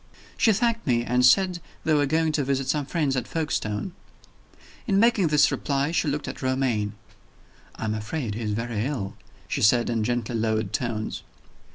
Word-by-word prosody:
She 225 - +4
thanked 230 0 0
me, 120 -2 +2
and 125 +1 +2
said 180 +7 +4 0.2
they 160 - +2
were 145 -2 +3
going 160 +2 +1
to 150 -2 0
visit 135 0 -1
some 145 0 0
friends 145 -4 0
at 125 -2 -2
Folkestone. 155 - -2 1.0
In 200 -3 +3
making 225 -5 +4
this 150 -2 +4
reply, 140 +2 -1
she 170 - 0
looked 145 0 -2
at - - -6
Romayne. 130 -6 0 0.8
"I - - -5
am 110 - 0
afraid 110 +2 -3
he 115 - -5
is 105 -2 -1
very 115 -1 -2
ill," 115 -8 -3 0.3
she - - -2
said, 120 +2 +4
in 115 -2 0
gently 120 0 -1
lowered 110 -2 -1
tones. 115 -3 -2
130 Hz, 180 wpm, -25 LUFS, 115-155 Hz, 1.0 s, She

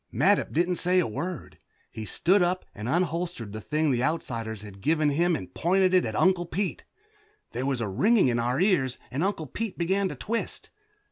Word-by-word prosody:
Mattup - - +2
didn't 175 +2 +1
say 180 +1 +2
a 180 - +4
word. 175 +11 -5 0.3
He 110 -1 -6
stood 185 - +2
up 180 +1 0
and 105 +3 -5
unholstered 170 - -1
the 110 +1 -6
thing 155 +4 0
the 120 -2 +1
Outsiders 115 -8 -2
had 100 -2 -11
given 155 +1 +2
him 170 +4 +2
and 95 -11 -7
pointed 185 +2 +2
it 185 - +4
at 110 -1 -4
Uncle 180 - +2
Pete. 195 +3 -3 0.7
There 130 +3 -3
was 135 -3 0
a 110 - -1
ringing 190 - +3
in 120 -1 +1
our 120 +3 0
ears 175 -10 +2
and 140 +6 -1
Uncle 190 -5 -1
Pete 220 - -5
began 190 +3 +1
to - - -6
twist. 230 +2 -4
165 Hz, 195 wpm, -27 LUFS, 120-185 Hz, 0.7 s, a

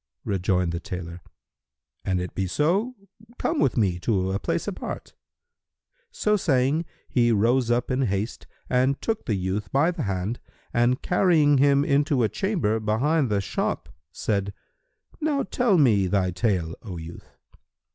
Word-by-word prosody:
Rejoined 90 -2 0
the 85 - -3
tailor, 85 0 -7 0.8
"An 95 -1 0
it 90 0 -5
be 95 -1 -1
so, 190 - +1 0.4
come 320 -2 -1
with 130 - +2
me 95 -6 +1
to 95 -1 0
a 100 - -1
place - - -2
apart." - - -6 1.0
So 210 0 +1
saying, 145 -1 +1 0.2
he 120 -2 +2
rose 115 +3 +2
up 120 +1 +1
in 130 +1 +1
haste 100 +3 -3 0.2
and 130 +2 +2
took 225 -2 -3
the 110 - +1
youth 95 +1 -3
by 145 +6 +3
the 170 - -5
hand 100 +3 -2 0.3
and 120 +2 +2
carrying 160 -6 +3
him 140 0 +4
into 140 -3 +2
a 110 - +2
chamber 170 - 0
behind 130 +7 +1
the 100 -1 +1
shop, - - -2 0.2
said, 100 +2 -2 0.7
"Now 295 -3 0
tell 245 -6 +2
me 110 - +4
thy 95 -1 +1
tale, 90 -3 0
O 95 -5 -7
youth!" 80 +1 -11
115 Hz, 150 wpm, -25 LUFS, 95-145 Hz, 1.0 s, him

